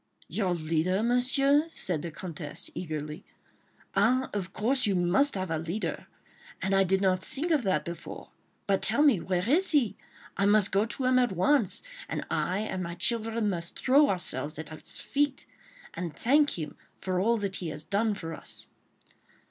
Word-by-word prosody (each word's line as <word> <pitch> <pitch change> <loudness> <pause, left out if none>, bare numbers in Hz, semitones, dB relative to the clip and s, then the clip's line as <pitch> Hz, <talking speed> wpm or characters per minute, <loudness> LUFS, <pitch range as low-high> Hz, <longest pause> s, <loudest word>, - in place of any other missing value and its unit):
"Your 180 +1 0
leader, 165 +5 0
Monsieur?" 275 +5 +3
said 175 - -1
the 170 - -4
Comtesse, 155 -2 -5
eagerly. 155 -3 -5 0.7
"Ah! 255 +3 +2
of 195 -2 -3
course, 250 +5 +1
you 200 - +2
must 180 +11 +2
have 185 -3 -3
a 160 - 0
leader. 170 +7 -4 0.5
And 190 +1 -1
I 195 0 +5
did 190 +1 +1
not 185 -2 +3
think 300 - -2
of 305 -4 +3
that 185 -6 +1
before! 170 -1 -8 0.3
But 195 -1 +1
tell 235 +9 +2
me 275 - +5
where 180 +2 -1
is 345 +9 +4
he? 235 -9 +3 0.4
I 200 - +3
must 205 -1 +4
go 200 +2 +3
to 250 +3 -4
him 255 0 +4
at 245 -5 +2
once, 215 - +2 0.3
and - - -3
I 185 +3 0
and 190 -3 -3
my 170 -1 -4
children 225 +3 0
must 170 -2 -4
throw 280 +3 +5
ourselves 155 -4 -2
at 160 0 -6
his 155 - -8
feet, 285 -1 -1 0.5
and 170 -5 -5
thank 285 - +3
him 155 -3 -6 0.2
for 185 -1 -2
all 230 +5 +3
that 200 -2 -2
he 175 - -4
has 150 0 -6
done 210 +4 0
for 165 -4 -6
us." - - -9
195 Hz, 180 wpm, -28 LUFS, 175-245 Hz, 0.7 s, I